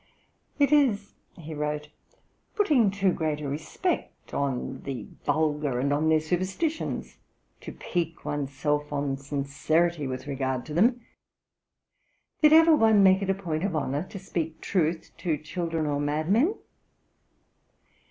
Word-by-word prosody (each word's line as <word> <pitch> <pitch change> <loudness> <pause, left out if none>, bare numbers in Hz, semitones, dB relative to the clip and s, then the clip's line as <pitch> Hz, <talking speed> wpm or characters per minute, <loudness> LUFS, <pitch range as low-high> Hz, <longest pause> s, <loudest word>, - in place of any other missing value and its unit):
'It 285 -2 +3
is,' 240 -9 +3 0.2
he 160 -2 -8
wrote, 150 0 -3 0.7
'putting 300 - +4
too 195 -2 +1
great 155 -2 -1
a 150 - -4
respect 160 - -3
on 135 -1 -2
the 130 -6 -5 0.2
vulgar 150 -4 +1
and 140 +2 +1
on 155 +2 +1
their 160 0 +5
superstitions 185 - -2 0.4
to - - -8
pique 165 -2 -3
one's 145 -2 -2
self 150 +2 -1
on 140 -1 -1
sincerity 145 +3 0
with 130 +1 -5
regard 130 -3 -2
to 155 - -7
them. 235 +9 +3 1.4
Did 300 -1 +7
ever 325 0 +7
one 220 -6 +5
make 190 0 +5
it 195 - -2
a 195 - +3
point 170 -4 -3
of 195 -4 -1
honour 145 -1 -1
to - - -7
speak 165 -4 -4
truth 165 -3 -1
to 165 -5 0
children 165 +1 -3
or 145 -1 0
madmen? 165 - +1
160 Hz, 140 wpm, -27 LUFS, 145-195 Hz, 1.4 s, Did